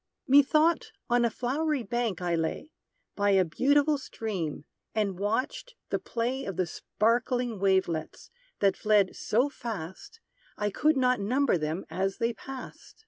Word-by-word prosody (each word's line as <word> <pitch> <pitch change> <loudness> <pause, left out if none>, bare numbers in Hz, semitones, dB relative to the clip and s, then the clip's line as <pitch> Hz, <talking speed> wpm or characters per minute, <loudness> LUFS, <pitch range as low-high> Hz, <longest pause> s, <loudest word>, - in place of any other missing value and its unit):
Methought, 305 +4 +4 0.2
on 240 0 +4
a 235 - +3
flowery 275 +4 -1
bank 230 -4 -2
I 175 -1 0
lay, 165 - -2 0.4
By 205 0 +2
a 185 - +4
beautiful 285 - +2
stream; 190 - -4 0.3
and 200 -4 0
watched 255 - -2 0.2
the - - +1
play 245 +3 -2
Of 195 - -4
the 185 - +2
sparkling 235 +5 0
wavelets, 190 -5 0 0.3
that 195 -1 +4
fled 210 -3 +2
so 245 +6 +1
fast, 225 - -7 0.4
I 210 0 -1
could 305 +8 +2
not 255 -1 +3
number 250 +6 +2
them 155 +2 -2
as 195 +1 -2
they 230 +1 0
passed. 265 +2 -10
230 Hz, 140 wpm, -28 LUFS, 190-265 Hz, 0.4 s, Methought